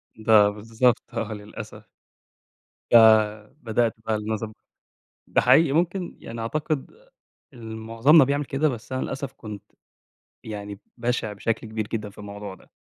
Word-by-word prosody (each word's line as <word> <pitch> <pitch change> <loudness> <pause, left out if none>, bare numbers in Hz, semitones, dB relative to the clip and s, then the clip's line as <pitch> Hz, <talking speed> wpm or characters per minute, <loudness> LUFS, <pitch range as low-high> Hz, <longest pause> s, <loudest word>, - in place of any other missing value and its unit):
ده 110 -2 +5
بالضبط، 115 +4 +1
آه 110 0 -3
للأسف. 105 0 -10 1.0
ف - - +6 0.7
بدأت 115 0 +1
بقى 110 - 0
النظام 110 +1 -3
ده. - - -20 0.7
ده - - +2
حقيقي 135 +5 +5
ممكن 175 +3 -1
يعني 115 0 -7
أعتقد 150 +5 -2 0.6
ال 115 -3 -8
معظمنا 115 +7 +5
بيعمل 140 +2 0
كده، 140 +3 0
بس 120 -3 -6
أنا 130 - -1
للأسف 135 0 -4
كنت 105 -3 -9 0.8
يعني 105 -2 -7 0.2
بشع 120 -2 -1
بشكل 110 +3 -2
كبير 110 -1 -3
جدًا 110 -2 -4
في - - -20
الموضوع 105 -1 -8
ده. - - -21
115 Hz, 140 wpm, -24 LUFS, 105-130 Hz, 1.0 s, ف